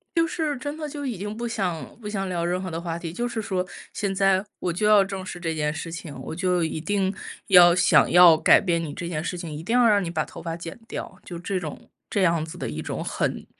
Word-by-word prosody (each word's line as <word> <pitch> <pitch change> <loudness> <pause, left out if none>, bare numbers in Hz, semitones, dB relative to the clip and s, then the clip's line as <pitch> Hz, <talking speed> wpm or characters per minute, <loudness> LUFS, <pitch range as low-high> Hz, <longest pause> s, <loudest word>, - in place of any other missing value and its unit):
就 330 0 +3
是 310 -3 -2
真 290 +3 -5
的 305 -1 -4
就 290 0 -6
已 245 -6 -3
经 205 +3 -5
不 240 +2 -3
想 190 -8 -3
不 210 - -5
想 195 -2 -2
聊 175 -2 -2
任 180 +1 -1
何 185 - -4
的 165 -1 -4
话 170 -1 -3
题， 170 -1 -6
就 240 +6 -2
是 230 -2 -3
说 185 -3 -2 0.3
现 200 -2 -2
在 195 0 +3 0.2
我 175 - -1
就 185 +5 -1
要 210 -2 +7
正 195 -1 -5
视 175 - -7
这 165 -2 -2
件 150 -1 -1
事 165 +1 -6
情。 165 -3 -7
我 145 - -6
就 180 -1 +1
一 160 -1 -2
定 195 +1 0 0.3
要 175 -3 +8
想 175 - +5
要 175 -2 +9
改 - - +6
变 170 -3 0
你 150 -3 -5
这 170 - -5
件 155 -2 -3
事 180 - -3
情， 170 -2 -6
一 150 - -6
定 230 +7 +1
要 245 -2 +6
让 205 -2 +4
你 170 - -3
把 160 -2 -1
头 - - -10
发 165 -1 -4
剪 165 -1 -8
掉， 190 - -7
就 175 - -7
这 185 +1 -2
种 155 -4 -8 0.2
这 200 - +1
样 170 -3 +2
子 160 +2 -8
的 - - -4
一 75 +1 -5
种 - - -4
很 - - -2
180 Hz, 285 characters per minute, -25 LUFS, 170-205 Hz, 0.3 s, 要